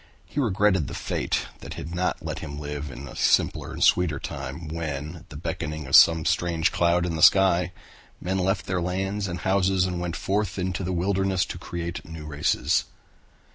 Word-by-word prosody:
He -, -, -5 dB
regretted 100 Hz, -, +2 dB
the -, -, -6 dB
fate -, -, -1 dB
that -, -, -8 dB
had 80 Hz, +4 st, -6 dB
not 90 Hz, +1 st, -1 dB
let -, -, -3 dB
him 70 Hz, -, -7 dB
live 75 Hz, 0 st, -5 dB
in 65 Hz, +2 st, -8 dB
a -, -, -10 dB
simpler -, -, +2 dB
and -, -, -2 dB
sweeter 85 Hz, -5 st, +4 dB
time 70 Hz, +4 st, -6 dB
when 75 Hz, 0 st, -4 dB
at 85 Hz, +3 st, -16 dB
the 80 Hz, -, -11 dB
beckoning 80 Hz, -1 st, -4 dB
of 65 Hz, -, +2 dB
some 80 Hz, -1 st, +7 dB
strange 85 Hz, -2 st, +1 dB
cloud 85 Hz, 0 st, +2 dB
in 85 Hz, -2 st, -2 dB
the 80 Hz, -, -3 dB
sky 90 Hz, -2 st, +5 dB, 0.5 s
men 95 Hz, +2 st, -1 dB
left 95 Hz, +2 st, 0 dB
their 90 Hz, -1 st, -1 dB
lands 95 Hz, +3 st, -2 dB
and 85 Hz, -1 st, -5 dB
houses 95 Hz, -1 st, +2 dB
and 90 Hz, -1 st, -2 dB
went 90 Hz, -1 st, -3 dB
forth 105 Hz, +2 st, -1 dB
into 95 Hz, 0 st, -2 dB
the 90 Hz, -, -2 dB
wilderness 95 Hz, +1 st, +1 dB
to -, -, -7 dB
create 85 Hz, 0 st, -5 dB
new 80 Hz, -1 st, -9 dB
races. 75 Hz, -1 st, +1 dB
85 Hz, 190 wpm, -25 LUFS, 80-95 Hz, 0.5 s, some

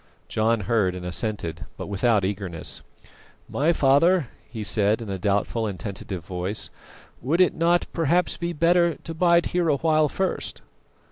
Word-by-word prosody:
John 110 Hz, 0 st, +1 dB
heard 95 Hz, -2 st, +1 dB
and 90 Hz, -1 st, -7 dB
assented, 90 Hz, -4 st, -3 dB
but -, -, -5 dB
without 100 Hz, 0 st, +1 dB
eagerness. 95 Hz, -5 st, -3 dB, 0.7 s
"My 150 Hz, +4 st, +1 dB
father," 150 Hz, +1 st, +3 dB, 0.2 s
he 110 Hz, -1 st, -5 dB
said, 105 Hz, +1 st, +2 dB
in 110 Hz, -4 st, -6 dB
a 95 Hz, -, -3 dB
doubtful 105 Hz, +3 st, 0 dB
and 95 Hz, -4 st, -5 dB
tentative 95 Hz, -2 st, -6 dB
voice, 90 Hz, +3 st, -4 dB, 0.5 s
"would 150 Hz, +8 st, 0 dB
it 185 Hz, -, +5 dB
not 170 Hz, +1 st, +2 dB
perhaps 170 Hz, +2 st, +1 dB
be 170 Hz, 0 st, -3 dB
better 170 Hz, +1 st, +3 dB
to 165 Hz, -, -8 dB
bide 170 Hz, +1 st, +3 dB
here 175 Hz, -1 st, +2 dB
awhile 155 Hz, +1 st, +2 dB
first?" 190 Hz, +5 st, -3 dB
115 Hz, 150 wpm, -24 LUFS, 100-165 Hz, 0.7 s, it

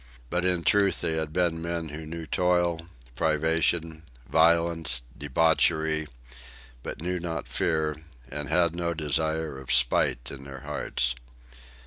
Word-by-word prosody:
But 90 Hz, +1 st, 0 dB
in 90 Hz, -2 st, +1 dB
truth 100 Hz, -2 st, +3 dB
they -, -, 0 dB
had 80 Hz, -1 st, -2 dB
been 85 Hz, -1 st, 0 dB
men 85 Hz, -1 st, -3 dB
who 75 Hz, +1 st, -7 dB
knew 85 Hz, +1 st, -6 dB
toil, 85 Hz, -1 st, +1 dB, 0.3 s
privation, 80 Hz, +2 st, +1 dB, 0.3 s
violence, 80 Hz, -5 st, +3 dB
debauchery 80 Hz, +1 st, +2 dB, 0.7 s
but 75 Hz, -, -7 dB
knew 90 Hz, +1 st, -1 dB
not 80 Hz, -3 st, -4 dB
fear, 80 Hz, -1 st, 0 dB, 0.3 s
and 75 Hz, +2 st, -5 dB
had 85 Hz, 0 st, +2 dB
no 85 Hz, -1 st, -1 dB
desire 80 Hz, -1 st, -1 dB
of 65 Hz, -1 st, -6 dB
spite -, -, +3 dB
in 70 Hz, -1 st, -7 dB
their 70 Hz, -1 st, -9 dB
hearts. 60 Hz, 0 st, -1 dB
80 Hz, 130 wpm, -27 LUFS, 75-85 Hz, 0.7 s, truth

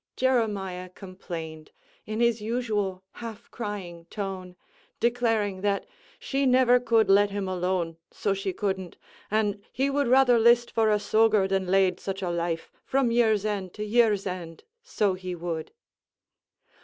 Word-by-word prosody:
Jeremiah 205 Hz, -8 st, 0 dB
complained, 170 Hz, -4 st, -8 dB, 0.4 s
in 215 Hz, +2 st, -2 dB
his 235 Hz, -2 st, +2 dB
usual 210 Hz, -5 st, -2 dB, 0.2 s
half 230 Hz, -1 st, -8 dB
crying 185 Hz, -7 st, -6 dB
tone, 190 Hz, -3 st, -5 dB, 0.4 s
declaring 225 Hz, -5 st, +1 dB
that 200 Hz, 0 st, 0 dB, 0.3 s
"she 275 Hz, 0 st, -1 dB
never 250 Hz, -1 st, +5 dB
could 225 Hz, -3 st, +3 dB
let 200 Hz, +1 st, +5 dB
him 200 Hz, -1 st, -3 dB
alone, 180 Hz, -2 st, -1 dB
so 200 Hz, -, -1 dB
she 195 Hz, 0 st, -2 dB
couldn't, 190 Hz, -2 st, -3 dB, 0.3 s
and 210 Hz, -1 st, 0 dB
he 270 Hz, +3 st, 0 dB
would 285 Hz, -1 st, +1 dB
rather 250 Hz, -1 st, +5 dB
list 235 Hz, +1 st, +4 dB
for 225 Hz, -1 st, +2 dB
a 210 Hz, -, +4 dB
soger 215 Hz, -1 st, +3 dB
than 190 Hz, -1 st, 0 dB
lade 185 Hz, -1 st, +3 dB
such 195 Hz, 0 st, -5 dB
a 175 Hz, -, -1 dB
life, 170 Hz, -1 st, -3 dB
from 265 Hz, -3 st, +1 dB
year's 220 Hz, -3 st, +3 dB
end 195 Hz, -4 st, -3 dB
to 210 Hz, -, -4 dB
year's 215 Hz, -2 st, +3 dB
end, 175 Hz, -3 st, -6 dB, 0.2 s
so 210 Hz, -, 0 dB
he 185 Hz, -1 st, -5 dB
would." 165 Hz, -2 st, -4 dB
205 Hz, 145 wpm, -26 LUFS, 185-230 Hz, 0.4 s, never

